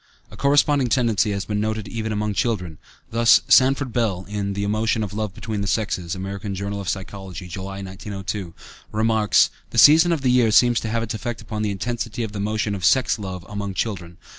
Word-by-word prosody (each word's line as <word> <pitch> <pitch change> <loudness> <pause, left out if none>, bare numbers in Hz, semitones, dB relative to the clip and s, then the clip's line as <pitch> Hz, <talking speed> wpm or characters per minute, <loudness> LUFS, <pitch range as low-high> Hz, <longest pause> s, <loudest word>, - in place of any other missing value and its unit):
A - - -11
corresponding 140 -1 +3
tendency 115 -5 +2
has 100 -1 -2
been 105 -1 -2
noted 110 -1 -2
even 110 +2 -4
among 105 0 -1
children. 90 -8 -2 0.3
Thus, 115 0 +5
Sanford 130 -1 +4
Bell 105 -7 0
("The 100 0 -3
Emotion 110 +2 0
of 105 - -5
Love 105 -2 -3
Between 110 -2 -4
the 100 - -2
Sexes," 95 -5 -1
American 100 +1 -5
Journal 100 +1 -4
Psychology, 95 -1 -5
July, 95 +3 -6
1902) 95 -1 -6 0.4
remarks: 110 -1 +3 0.2
"The 115 - -7
season 160 +7 +7
of 160 -5 -1
the 125 - +3
year 125 -2 +4
seems 120 +2 +4
to 115 - -4
have 115 +1 -1
its 110 - -4
effect 115 +2 -4
upon 110 -2 -5
the 105 - 0
intensity 115 +3 -3
of 110 - -4
the 105 - -6
emotion 105 +1 -1
of 95 -3 -5
sex 120 +2 +3
love 95 -3 -6
among 100 -2 -5
children. 90 -5 -4
105 Hz, 190 wpm, -22 LUFS, 100-115 Hz, 0.4 s, season